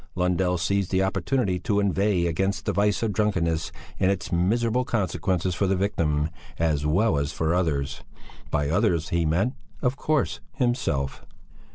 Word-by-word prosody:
Lundell 90 0 +1
seized 95 +2 0
the 95 0 +2
opportunity 95 -1 0
to 105 -2 0
inveigh 100 -2 +2
against 95 +4 -1
the - - 0
vice 100 +3 +1
of 110 -3 0
drunkenness 85 -7 0 0.3
and 95 - +3
its 95 -4 -2
miserable 115 +8 +2
consequences 95 -4 -1
for 100 +2 0
the 95 - +2
victim 80 -6 0 0.3
as 75 -3 +1
well 85 0 +2
as 70 +1 -1
for 80 0 0
others; 75 -6 -1 0.5
by 75 -1 0
others 85 -1 +1
he 85 -1 +1
meant, 95 - +1 0.3
of 125 +1 +1
course, 155 -1 0
himself. 120 - -1
90 Hz, 155 wpm, -25 LUFS, 80-105 Hz, 0.5 s, and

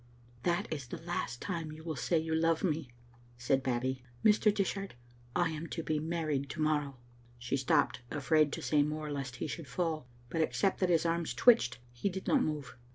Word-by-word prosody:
That 175 +5 +1
is 140 -5 -5
the 170 - -5
last 165 -7 -3
time 165 -5 -3
you 155 +1 -10
will 160 -2 -3
say 165 +5 +1
you 160 0 -1
love 165 0 +2
me," 155 -6 0 0.5
said 135 +2 +2
Babbie. 130 0 -1
" 120 - -16
Mr. 210 0 +6
Dishart, 195 - -2 0.4
I 175 -2 +2
am 160 +1 -5
to 165 - -4
be 155 -1 0
married 155 -4 -1
to 155 - -6
morrow." 150 -3 +1 0.4
She 120 +2 -2
stopped, 130 -1 +2
afraid 150 +1 +3
to - - -4
say 150 -1 +3
more 150 +1 -2
lest 135 -3 -4
he - - -3
should 155 0 -5
fall, 155 -1 -2 0.2
but 165 - +1
except 190 +4 +1
that 185 - +2
his 170 -1 +3
arms 165 0 0
twitched 230 - +5
he 120 +11 -1
did 190 0 -5
not 280 - +4
move. 150 - -2
155 Hz, 200 wpm, -32 LUFS, 140-170 Hz, 0.5 s, Mr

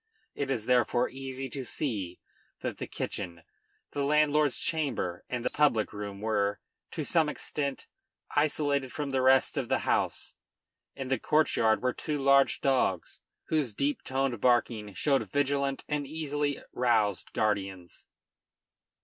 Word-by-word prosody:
It 140 -1 -3
is 120 -5 -1
therefore 125 0 +3
easy 135 0 -5
to 135 - -4
see 105 - -3 0.4
that - - -4
the - - -4
kitchen, 85 -2 -5 0.5
the 140 - -1
landlord's 150 -1 +3
chamber, 140 - -2
and 120 -1 -3
the - - +1
public 130 -9 +2
room 100 -1 -6
were, 105 -2 0 0.3
to 155 - -4
some 160 -1 +2
extent, 140 -2 -3 0.5
isolated 145 -3 +1
from 145 -2 -3
the 130 -1 +1
rest 130 0 +4
of - - -4
the - - +1
house. - - 0 0.6
In 135 -2 -5
the 130 - +1
courtyard 125 -8 +2
were 125 -1 +2
two 150 -1 -3
large 140 0 +4
dogs, 125 -10 +1 0.3
whose 145 -9 0
deep 145 +4 0
toned 130 -4 -1
barking 115 -5 +2
showed 135 -3 +1
vigilant 140 -1 0
and 145 -2 -2
easily 145 -2 -2
roused 110 -6 +1
guardians. 95 -5 -2
135 Hz, 140 wpm, -29 LUFS, 110-145 Hz, 0.6 s, rest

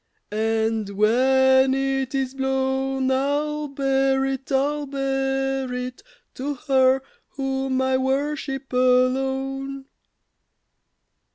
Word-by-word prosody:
And 220 0 0
when 260 +5 +4
it 270 0 -1
is 265 -1 -1
blown, 265 0 0
I'll 295 +3 0
bear 270 -1 +1
it, 270 0 -4
I'll 290 +2 0
bear 270 -1 -1
it 250 0 -5 0.3
To 280 +2 -4
her 265 -1 +2 0.2
whom 265 -1 -2
I 260 0 +2
worship 270 0 -2
alone. 265 +2 +1
265 Hz, 90 wpm, -23 LUFS, 260-270 Hz, 0.3 s, when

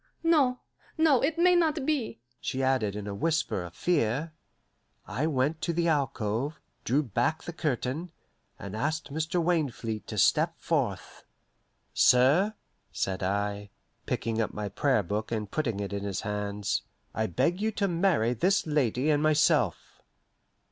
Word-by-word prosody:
"No, 290 -7 +3 0.4
no, 315 -6 +4
it 315 +4 0
may 360 +1 +5
not 315 -4 +2
be," 280 - -1 0.2
she 135 +1 -2
added 130 -7 +1
in 105 -1 -5
a 100 - -4
whisper 155 - 0
of 90 -1 -9
fear. 150 -1 0 0.7
I 150 +6 -1
went 150 +2 0
to 170 - -1
the 170 +1 +1
alcove, 135 -1 -1 0.2
drew 140 +6 +2
back 120 +6 -1
the 170 - -6
curtain, 150 +2 -2 0.5
and 100 +1 -7
asked 150 +4 -2
Mr. 160 +3 -1
Wainfleet 145 -10 -1
to - - -6
step - - +3
forth. - - -2 0.7
"Sir," 145 +13 +4 0.4
said 95 -1 -2
I, 100 +1 -2 0.4
picking 115 0 -1
up 110 - -3
my 105 -1 -3
Prayer 130 +1 +1
Book 105 +5 -3
and 105 -3 -3
putting 120 -10 -1
it 100 0 -4
in 100 0 -3
his 100 -2 -3
hands, 105 -1 -2 0.3
"I 110 0 0
beg 175 - 0
you 220 - +1
to 200 -1 0
marry 170 - +2
this 185 - +2
lady 145 -2 +1
and 145 -1 +2
myself." 155 0 +2
140 Hz, 150 wpm, -28 LUFS, 110-170 Hz, 0.7 s, may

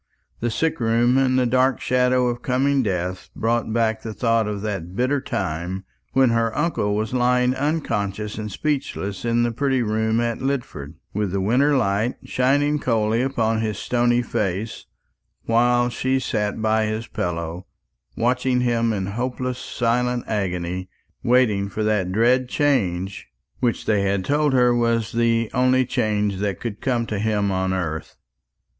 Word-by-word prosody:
The 120 - -1
sick 160 +8 -1
room 120 +2 +2
and 130 -1 +2
the 130 - +3
dark 130 +2 +2
shadow 125 0 +2
of 120 0 -2
coming 135 +2 +1
death 90 -4 -3
brought 115 0 0
back 110 -1 +1
the 110 -1 -6
thought 115 -2 +1
of 105 -1 -4
that 95 -4 -4
bitter 130 +5 +1
time 90 0 -3 0.3
when 130 -2 +4
her 115 -1 0
uncle 150 -10 0
was 110 +2 -2
lying 125 0 +2
unconscious 110 -8 -2
and 105 -1 -5
speechless 100 -7 -3
in 120 0 +2
the 120 - +1
pretty 130 +1 0
room 110 +1 0
at 120 -1 -1
Lidford, 120 - -3 0.2
with 105 -2 -1
the 100 - -1
wintry 130 +9 +3
light 110 0 +1
shining 145 +3 +1
coldly 115 -3 +1
upon 115 -4 0
his 110 -2 -2
stony 120 0 +1
face; 105 0 -3 0.6
while 120 +1 +3
she 130 +2 0
sat 105 -4 -2
by 110 0 +2
his 110 +1 -3
pillow, 85 -2 -4 0.5
watching 125 +1 +1
him 115 -2 +1
in 100 -3 -2
hopeless 125 +4 -3
silent 125 +1 0
agony, 90 -3 -2 0.3
waiting 115 -5 +2
for 110 +2 -3
that 105 -4 +1
dread 125 +5 +2
change 100 - 0 0.3
which 120 -3 0
they 105 -2 +2
had 100 -1 0
told 150 0 +2
her 125 -1 +4
was 115 -2 +1
the 115 -1 +1
only 130 +1 +3
change 105 -4 0
that 100 -2 -2
could 110 -4 -5
come 120 -3 0
to 105 -3 -3
him 105 -2 0
on 95 0 0
earth. 80 -4 -3
115 Hz, 155 wpm, -22 LUFS, 105-125 Hz, 0.6 s, when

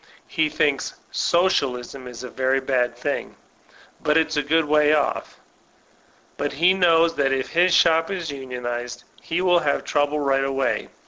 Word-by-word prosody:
He 160 -1 0
thinks 140 -3 -1 0.2
Socialism 135 -7 0
is 125 0 -9
a 125 - -7
very 130 +1 0
bad 130 -2 -1
thing; - - -4 0.7
but 150 +1 +2
it's 160 - +1
a 150 - +2
good 160 +2 +1
way 150 0 +3
off! 145 - -2 1.0
But 145 -1 -2
he 170 +6 +4
knows 170 -3 +3
that 135 -1 +1
if 135 -1 -2
his 175 +2 +3
shop 165 0 +3
is 180 -6 -4
unionized, 125 -3 -6 0.2
he 170 +2 -2
will 180 -1 +4
have 145 -3 -1
trouble 145 0 0
right 135 -1 +1
away. 135 -1 -1
145 Hz, 155 wpm, -22 LUFS, 130-165 Hz, 1.0 s, he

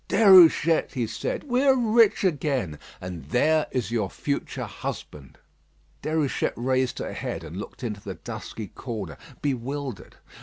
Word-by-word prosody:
"Déruchette," 180 -6 +6
he 125 -4 -1
said, 110 - -3
"we 255 -3 +1
are 270 -1 +5
rich 230 -3 +4
again; 135 - 0 0.2
and 90 -5 -7
there 150 - +2
is 125 -3 -2
your 110 -5 0
future 140 +6 -3
husband." 70 -3 -7 0.6
Déruchette 155 -3 0
raised 130 +1 0
her - - -4
head, - - -4
and 80 +3 -8
looked 105 - -8
into 105 -4 -4
the - - -6
dusky 110 -4 -7
corner 105 - -6 0.3
bewildered. 135 -3 -3
130 Hz, 140 wpm, -25 LUFS, 105-160 Hz, 0.6 s, Déruchette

